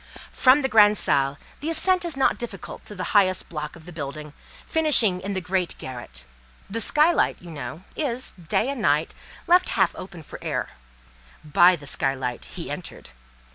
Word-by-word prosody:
From 270 +2 +4
the - - +2
grande 210 -3 +5
salle 140 -3 +1 0.2
the 305 - -4
ascent 360 +3 +2
is 335 -5 -2
not 270 - +2
difficult 215 -6 -7
to 210 - -8
the 185 - -4
highest 190 -3 +3
block 150 -2 -6
of 165 -1 -15
building, 150 0 -7 0.3
finishing 250 - +4
in 200 +2 -4
the 190 - -2
great 180 0 -2
garret. 120 - -8 0.4
The 230 +3 -2
skylight, 305 +9 +3
you 175 -2 -11
know, 160 +3 -7
is, 255 -4 -1
day 180 - -1
and 280 -4 -4
night, 150 -3 +1 0.3
left 360 +1 +4
half - - +2
open 175 -4 -9
for - - -10
air; - - -3 0.7
by 175 +4 +5
the 150 -4 -12
skylight 130 -3 -2
he - - -7
entered. - - -7
185 Hz, 170 wpm, -24 LUFS, -, 0.7 s, grande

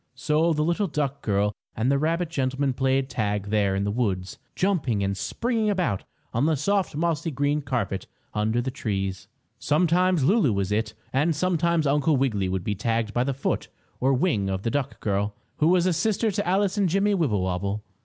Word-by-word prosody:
So 155 +5 +2
the 150 -1 +1
little 170 +5 +1
duck 140 -3 -2
girl 105 0 +1 0.2
and 120 +4 +2
the 140 - +2
rabbit 165 +3 0
gentleman 135 -1 0
played 135 +1 +1
tag 105 -5 -2
there 100 -3 +2
in 100 - 0
the 100 - 0
woods, 100 -5 -2 0.2
jumping 145 - +1
and 100 0 0
springing 225 - -1
about 180 - 0 0.3
on 120 +6 +2
the 160 - +3
soft 190 +4 0
mossy 165 0 0
green 145 +1 0
carpet 130 -8 -2 0.3
under 110 +3 +1
the 130 - -2
trees. 95 -7 -3 0.3
Sometimes 175 +1 +2
Lulu 165 - +3
was 100 0 -1
"it" 110 +1 -1 0.2
and 150 +5 +2
sometimes 170 -1 +1
Uncle 145 +1 +3
Wiggily 105 -8 0
would 95 -1 -2
be 105 - -1
tagged 115 +1 -1
by 120 - +2
the 135 0 -2
foot 135 - -1 0.3
or 130 +2 +2
wing 125 - +1
of 95 0 -2
the 115 - 0
duck 140 -1 -2
girl, 100 0 -1 0.2
who 155 - +3
was 180 0 +4
a 185 - +3
sister 215 +6 +1
to 200 -1 -2
Alice 195 +2 +1
and 195 -3 +3
Jimmie 195 +4 +2
Wibblewobble. 100 - 0
135 Hz, 190 wpm, -25 LUFS, 105-170 Hz, 0.3 s, was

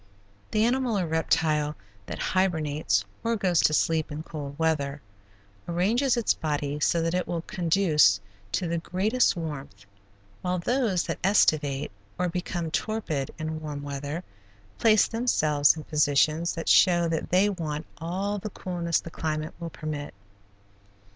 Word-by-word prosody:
The 215 0 +2
animal 245 -2 +1
or 185 - 0
reptile 155 -2 +1 0.3
that - - -5
hibernates, 155 - +1 0.2
or 230 0 +1
goes 185 -5 +1
to - - +4
sleep 160 0 +1
in 150 +2 -5
cold 145 -3 -7
weather, 150 -3 0 0.7
arranges 225 +10 +2
its 235 - +2
body 145 -2 -2
so 165 +2 +2
that 165 +1 0
it 180 0 0
will 170 -1 -3
conduce 165 - +3 0.3
to 180 - 0
the 170 0 -1
greatest 205 +9 +1
warmth, 140 - -6 0.6
while 180 0 -1
those 220 -1 +1
that - - -4
estivate, 150 -8 +2 0.3
or 180 0 0
become 175 -1 -3
torpid 160 -10 -2
in 155 0 -4
warm 145 -2 -5
weather, 145 +4 -4 0.6
place 215 -2 +5
themselves 155 -12 +2
in 155 - -6
positions 155 +2 +2
that 165 -1 -6
show 175 -2 +5
that 160 -1 -2
they 185 +3 +4
want 160 -6 -3
all 195 +5 -2
the 215 - -5
coolness 175 -3 -1
the 165 - -9
climate 155 -1 -3
will 170 -1 -5
permit. 150 -2 -6
165 Hz, 145 wpm, -27 LUFS, 150-185 Hz, 0.7 s, place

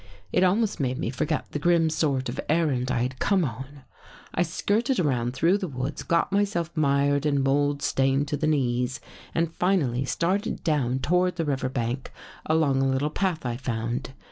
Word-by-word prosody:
It 180 - +4
almost 205 +4 +2
made 130 -2 -1
me 115 - -2
forget 150 +4 -2
the 150 - -3
grim 170 +1 +3
sort 140 -5 0
of 120 - -5
errand 145 -6 +1
I 125 -2 +1
had 130 +1 -4
come 190 -4 +2
on. 135 +3 -7 0.5
I - - 0
skirted 215 - 0
around 125 -6 0
through 170 +8 +3
the 190 - -3
woods, 135 0 -4
got 170 +2 +1
myself 195 -5 0
mired 140 -1 +2
and 140 -2 +1
mold 145 +1 +1
stained 135 +2 +1
to 145 - -1
the 155 - 0
knees 125 -4 0 0.4
and 165 0 0
finally 150 -11 +1
started 185 +9 -1
down 130 -5 0
toward 180 +3 +2
the 165 -2 -1
river 135 -3 -1
bank 125 0 -3 0.4
along 155 -4 +2
a 135 - +2
little 135 +3 0
path 175 -4 -1
I 120 -1 -2
found. 120 +1 -3
145 Hz, 180 wpm, -26 LUFS, 130-170 Hz, 0.5 s, It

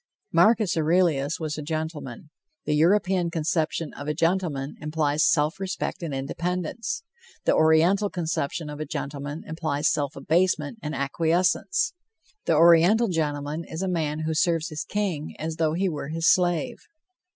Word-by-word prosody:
Marcus 215 -4 +4
Aurelius 160 -3 +2
was 155 -2 -3
a - - -4
gentleman. 155 -3 -5 0.3
The 150 - 0
European 180 +2 +3
conception 160 0 -1
of 145 - -8
a 150 - -1
gentleman 165 -5 0
implies 150 0 0
self 155 +3 +1
respect 190 0 -3
and 165 -3 -4
independence; 175 - -3 0.4
the - - +4
Oriental 165 +6 +4
conception 165 -3 -2
of 150 0 -7
a 155 - -3
gentleman 145 +2 -5
implies 155 -2 -1
self 145 -1 -2
abasement 160 +5 0
and 150 -1 -4
acquiescence. 170 - +1 0.5
The 165 - +3
Oriental 170 +8 +6
gentleman 150 -1 -2
is 160 +3 -5
a - - -1
man 155 -4 -1
who 160 0 -1
serves 165 +1 +1
his 155 +1 -4
king 190 -7 -3
as 160 +1 -4
though 160 -2 +1
he 190 +4 0
were 150 -5 -4
his 165 +2 -1
slave. 180 +7 +2
160 Hz, 150 wpm, -25 LUFS, 150-180 Hz, 0.5 s, Oriental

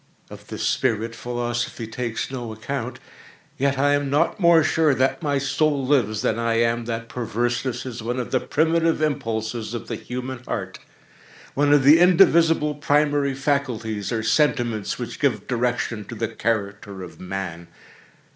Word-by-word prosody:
Of - - -11
this - - -5
spirit 115 +1 0
philosophy 120 -1 -3
takes 115 +2 -4
no 120 -4 -5
account. 125 +2 -5 0.6
Yet 140 0 +1
I 145 +1 +3
am 145 -1 0
not 150 +8 +1
more 170 -3 +6
sure 155 -3 +3
that 130 +6 +1
my 145 -3 0
soul 140 0 +1
lives, 120 -6 +1
than 115 -2 0
I 115 0 +1
am 115 0 +1
that 115 -1 -4
perverseness 120 +2 -2
is 125 -2 -6
one 120 +3 -2
of 125 - -4
the 130 - +2
primitive 165 +3 +1
impulses 115 -6 -2
of 115 -1 -6
the - - -2
human 125 +1 -6
heart—one 145 +1 -5
of 145 -2 +5
the 150 +4 +7
indivisible 170 -4 +5
primary 145 -1 +1
faculties, 125 -7 -1
or 110 -2 -1
sentiments, 120 -4 +1
which - - -6
give - - 0
direction 120 -2 -1
to 115 - -8
the 115 0 -2
character 100 -4 -3
of 80 -3 -11
Man. 90 -2 -5
125 Hz, 155 wpm, -23 LUFS, 115-145 Hz, 0.6 s, the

